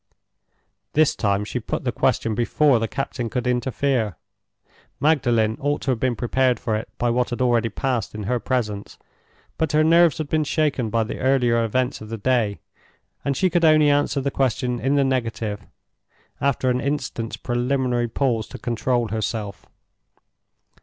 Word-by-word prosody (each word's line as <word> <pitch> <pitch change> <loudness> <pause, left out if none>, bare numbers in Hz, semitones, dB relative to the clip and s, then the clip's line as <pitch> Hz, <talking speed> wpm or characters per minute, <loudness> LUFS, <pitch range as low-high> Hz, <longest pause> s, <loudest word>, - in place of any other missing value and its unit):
This 155 0 +3
time 100 -1 0
she - - -3
put - - -4
the - - 0
question 115 - 0
before 120 +3 +3
the 115 - -1
captain 125 -2 -4
could 125 +2 -2
interfere. 125 - 0 0.8
Magdalen 120 -8 +2
ought 145 +1 0
to 135 - 0
have 120 - -1
been 130 -1 0
prepared 125 +1 +1
for 110 -3 -1
it 110 - -4
by 120 0 +1
what 125 +1 +1
had 120 - -4
already 120 -2 +2
passed 115 -3 -2
in 105 - -5
her 125 +5 0
presence, 105 -4 -3 0.6
but 160 -2 0
her 155 +1 +4
nerves 165 -1 +5
had 155 - -3
been 155 +1 +1
shaken 145 -6 0
by 115 +1 +1
the 110 - -6
earlier 125 -3 +2
events 125 +2 -1
of 110 - -9
the 115 - -4
day; 110 -2 +1 0.7
and 140 -1 -1
she 190 - +3
could 175 -1 +1
only 155 -2 +5
answer 145 0 +1
the 140 +1 -1
question 125 -2 0
in 135 +3 +1
the 140 - +4
negative, 115 -6 -2 0.7
after 130 -2 +1
an 125 0 0
instant's 135 -5 -3
preliminary 120 0 0
pause 115 -2 -1
to - - -9
control 120 -1 -1
herself. 105 -3 -4
125 Hz, 165 wpm, -23 LUFS, 115-140 Hz, 0.8 s, nerves